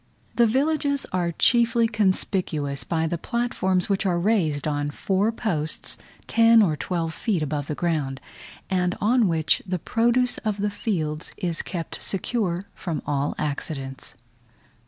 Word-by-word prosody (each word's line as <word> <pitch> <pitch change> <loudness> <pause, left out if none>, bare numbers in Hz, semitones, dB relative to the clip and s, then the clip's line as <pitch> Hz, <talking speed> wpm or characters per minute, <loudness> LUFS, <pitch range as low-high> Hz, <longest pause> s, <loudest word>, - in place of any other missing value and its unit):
The 235 -1 +5
villages 280 +3 +1
are 175 -2 +1
chiefly 235 +4 +4
conspicuous 185 - 0
by 165 -1 -1
the 170 +1 -2
platforms 190 -5 0
which 195 0 +1
are 180 -3 +1
raised 170 -8 +1
on 145 -1 -1
four 195 +8 0
posts 170 -10 -2 0.3
ten 230 -1 +6
or 160 -6 +2
twelve 165 +1 -2
feet 190 -7 -1
above 145 -1 -3
the 150 - -3
ground, 150 -6 -1 0.5
and 180 -1 0
on 230 +2 +3
which 160 -2 +2
the 185 -1 -2
produce 240 +7 +2
of 215 -2 -2
the 205 0 -1
fields 160 -7 -3
is 175 -4 -2
kept 170 -3 -5
secure 190 -2 -1
from 165 -4 -4
all 145 0 -1
accidents. 140 -2 -4
180 Hz, 140 wpm, -24 LUFS, 155-225 Hz, 0.5 s, ten